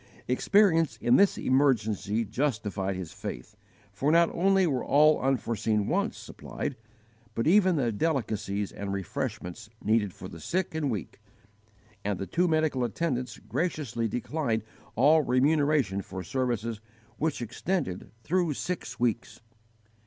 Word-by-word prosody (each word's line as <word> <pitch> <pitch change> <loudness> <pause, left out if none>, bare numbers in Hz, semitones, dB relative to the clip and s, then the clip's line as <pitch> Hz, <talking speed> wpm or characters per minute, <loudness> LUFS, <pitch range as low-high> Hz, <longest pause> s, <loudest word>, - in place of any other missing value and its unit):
Experience 165 +4 +3
in 120 - +3
this 200 0 +4
emergency 115 -5 +1
justified 105 -5 -1
his 90 -3 -6
faith; - - -7 0.4
for 140 +9 +1
not 170 +1 +5
only 195 +1 +3
were 135 -7 0
all 150 +2 +4
unforeseen 115 -5 0
wants - - 0
supplied, - - -6 0.6
but 115 - 0
even 185 +1 +5
the 125 -6 +1
delicacies 105 -7 -1
and 100 -1 -5
refreshments 110 -1 -4
needful 110 -1 +2
for 90 0 -10
the 85 - -10
sick 175 - -2
and 155 -3 -1
weak; 105 -9 -5 0.8
and 100 -1 -1
the 95 - -4
two 180 - +1
medical 155 -5 +1
attendants 125 -2 -2
graciously 140 -9 -2
declined 120 -1 -2 0.3
all 150 +7 +5
remuneration 140 -5 +2
for 95 0 -7
services 115 -1 -2 0.4
which 155 -1 0
extended 125 - -3
through 170 -1 +1
six 140 -9 -4
weeks. 120 -1 -1
125 Hz, 130 wpm, -28 LUFS, 105-155 Hz, 0.8 s, not